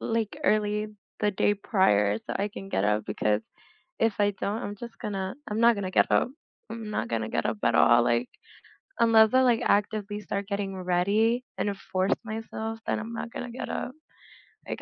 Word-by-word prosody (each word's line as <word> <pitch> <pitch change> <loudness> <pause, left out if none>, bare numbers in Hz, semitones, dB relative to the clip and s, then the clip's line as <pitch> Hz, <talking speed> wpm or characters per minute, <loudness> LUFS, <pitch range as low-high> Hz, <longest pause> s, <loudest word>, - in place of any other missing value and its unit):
like, 225 -2 -2
early 210 0 +2 0.3
the 210 - +2
day 205 +1 +2
prior 105 - +2
so - - -6
I 200 +1 -1
can 195 -1 -9
get 95 - +1
up 105 0 +1
because 105 +1 0 0.6
if 225 -2 +3
I 205 0 +3
don't, 210 +3 -1
I'm 205 - -5
just 235 +3 -9
gonna 195 -2 -3
I'm 210 +1 -2
not 235 0 +6
gonna 195 -2 -3
get - - +4
up. - - +3 0.4
I'm 225 -2 -6
not - - -2
gonna 110 -1 -2
get - - 0
up 110 0 -2
at 115 - +3
all, 120 0 +6
like, 120 +1 +1 0.7
unless 225 -1 +6
I, 260 - +6
like, 240 -3 +3
actively 205 0 0
start 200 -1 -4
getting 200 -1 -3
ready 200 +7 +1
and 205 -1 -1 0.2
force 185 +1 +1
myself, 225 0 -5
then - - 0
I'm 225 +2 -6
not 230 0 -5
gonna 245 - -5
get 245 - -6
up. 250 - -3 0.8
Like, - - -4
205 Hz, 190 wpm, -27 LUFS, 185-225 Hz, 0.8 s, not